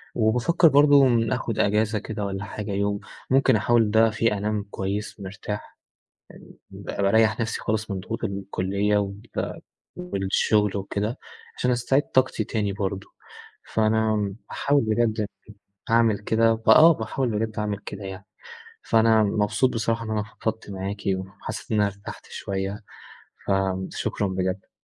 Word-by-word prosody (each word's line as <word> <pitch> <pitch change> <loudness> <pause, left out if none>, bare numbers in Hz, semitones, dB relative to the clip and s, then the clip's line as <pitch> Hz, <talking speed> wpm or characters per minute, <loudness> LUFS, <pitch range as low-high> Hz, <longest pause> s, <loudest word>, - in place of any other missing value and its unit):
وبافكر 125 +10 +3
برضه 145 -1 +6 0.3
آخد 115 -3 -3
أجازة 105 +1 +2
كده 105 -1 -5
والّا 95 0 -4
حاجة 105 0 -6
يوم، 100 +1 0 0.3
ممكن 135 -2 +4
أحاول 110 +1 +3
ده 110 +1 +5
فيه 110 -1 0
أنام 105 0 -1
كويس 100 +3 -4
مرتاح، 105 +1 -7 0.8
يعني - - -14
ب - - -14
بارَيَّح 110 +3 +2
نفسي 110 -1 -2
خالص 110 0 -2
من 95 - -2
ضغوط 115 +5 -6
ال 100 -2 -2
الكُلية 100 +2 0
وبتاع 100 0 -4 0.4
والشغل 105 - +1
وكده، 105 +5 -3 0.4
عشان 125 - +1
أستعيد 130 +4 +2
طاقتي 130 -3 +1
تاني 105 -2 -2
برضه، 100 -1 -3 0.7
فأنا 110 -2 +1 0.2
هاحاول 145 0 +2
بجد 110 0 +1
أ - - 0 0.6
هاعمل 115 -3 +3
كده، 115 +2 +2
فآه، 160 +9 +8
باحاول 125 +1 -2
بجد 110 -1 -3
أعمل 105 -1 -2
كده 100 0 -7
يعني. 95 0 -8 0.6
فأنا 110 -1 +4
مبسوط 105 +5 +1
بصراحة 115 0 -1
إن 110 - -4
أنا 105 -1 0 0.2
فضفت 110 -1 -3
معاكِ، 100 +1 -5
وحسيت 95 +4 -7
إن 110 - +2
أنا 105 - +4
ارتَحت 100 0 -9
شوية، 100 +2 -4 0.6
فشكرًا 95 +1 -1
بجد. 95 0 -3
105 Hz, 140 wpm, -24 LUFS, 100-115 Hz, 0.8 s, فآه